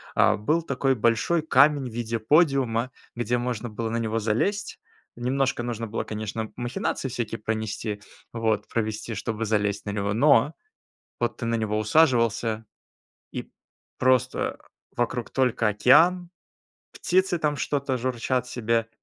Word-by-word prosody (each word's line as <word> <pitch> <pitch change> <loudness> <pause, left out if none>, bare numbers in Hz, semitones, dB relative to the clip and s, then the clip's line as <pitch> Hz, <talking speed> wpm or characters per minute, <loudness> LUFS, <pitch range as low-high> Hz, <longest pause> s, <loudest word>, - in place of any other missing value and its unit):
а, - - +4
был 155 +11 +1
такой 135 -3 0
большой 115 +9 +2
камень 145 -2 +4
в - - -13
виде 115 -1 -2
подиума, 130 -2 +2 0.3
где 120 +1 0
можно 120 -1 -3
было 110 +1 -4
на 115 - -1
него 115 -1 -1
залезть. 195 - -1 0.4
Немножко 130 0 0
нужно 115 -1 -3
было, 110 - -3
конечно, 110 +1 -4
махинации 125 +2 -2
всякие 115 -2 -4
пронести, 110 -1 -3 0.3
вот, 115 -2 -1
провести, 110 0 -2
чтобы 110 +2 -3
залезть 105 -1 0
на 105 - -3
него, 100 0 -1
но 140 +4 +4 0.7
вот 120 - 0
ты - - -4
на 115 0 +1
него 110 -1 -1
усаживался 115 -3 +2 0.7
и - - -6 0.5
просто 130 -1 +1 0.4
вокруг 120 0 -1
только 125 -4 +1
океан, 170 - +4 0.6
птицы 185 -1 +1
там 150 -2 0
что-то 140 -1 -1
журчат 125 0 -1
себе, 115 -2 0
120 Hz, 135 wpm, -25 LUFS, 110-135 Hz, 0.7 s, а